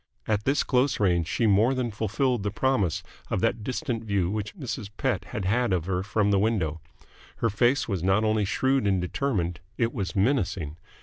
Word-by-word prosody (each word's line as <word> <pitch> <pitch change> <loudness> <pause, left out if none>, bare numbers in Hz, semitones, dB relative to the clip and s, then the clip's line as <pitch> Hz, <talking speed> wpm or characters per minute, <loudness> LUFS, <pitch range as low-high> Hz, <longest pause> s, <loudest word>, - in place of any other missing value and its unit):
At 105 -2 0
this 140 +2 +2
close 130 +1 +1
range 90 -5 +2
she 115 - 0
more 110 +5 +4
than 125 -2 -1
fulfilled 115 +3 0
the 105 - -1
promise 110 - 0 0.3
of - - 0
that 110 - 0
distant 125 -2 -3
view 100 -4 0
which 105 - -4
Mrs. 125 - -5
Pett 130 -2 -1
had 105 -6 -5
had 120 +4 +1
of 90 -3 0
her 90 -1 -1
from 105 +1 +1
the 100 - +3
window. 95 -8 0 0.5
Her 115 - 0
face 120 +7 +2
was 95 -6 -2
not 95 +4 +2
only 110 -1 +2
shrewd 130 +3 +1
and 95 -2 +2
determined: 90 - -1 0.2
it 115 0 +1
was 100 -2 -3
menacing. 95 - 0
105 Hz, 190 wpm, -26 LUFS, 95-125 Hz, 0.5 s, more